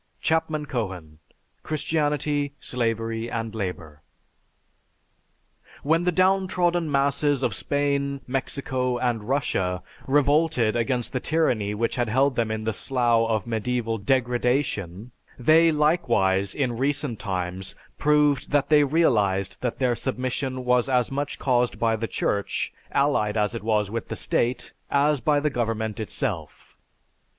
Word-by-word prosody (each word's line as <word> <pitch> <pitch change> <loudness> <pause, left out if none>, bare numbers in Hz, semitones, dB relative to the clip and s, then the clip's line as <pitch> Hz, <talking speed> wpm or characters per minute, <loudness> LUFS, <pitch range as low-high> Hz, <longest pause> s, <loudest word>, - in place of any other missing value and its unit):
(C. 160 - +1 0.3
Cohen: 90 - -5 0.4
"Christianity, 150 -2 -1
Slavery, 115 -2 -2
and 115 -1 -4
Labor.") 90 -8 -5 1.8
When 165 +4 +2
the 180 - +3
downtrodden 180 -3 +2
masses 140 0 +1
of 120 - +1
Spain, 140 +3 -1
Mexico, 130 -1 -2
and 120 -4 -1
Russia 95 -9 0 0.2
revolted 145 -4 +2
against 120 0 -1
the 130 - 0
tyranny 125 -10 0
which 115 +4 -1
had 120 -2 0
held 135 +3 +2
them 115 -2 0
in 110 0 -3
the 110 0 -1
slough 120 -1 +1
of 110 -3 0
medieval 115 0 -2
degradation, 120 - 0 0.3
they 160 +6 +5
likewise, 120 - +2
in 125 -5 -1
recent 140 -3 -1
times, 95 -2 -4 0.2
proved 150 -2 +2
that 145 -1 +1
they 150 -1 +6
realized 105 - +1
that 125 -2 -2
their 125 -2 +2
submission 130 +1 -3
was 125 +1 +2
as 125 -2 +2
much 140 +1 -3
caused 125 -2 +1
by 115 -1 +1
the 115 +1 -3
Church, 100 -2 -2 0.2
allied 115 -7 +1
as 105 +2 +1
it 115 - -4
is 105 -2 +1
with 115 0 -4
the - - -4
state, 120 +2 -1 0.2
as 145 -1 +2
by 145 +4 +2
the 150 0 0
government 110 -3 -2
itself. 110 - -4
125 Hz, 130 wpm, -25 LUFS, 110-145 Hz, 1.8 s, they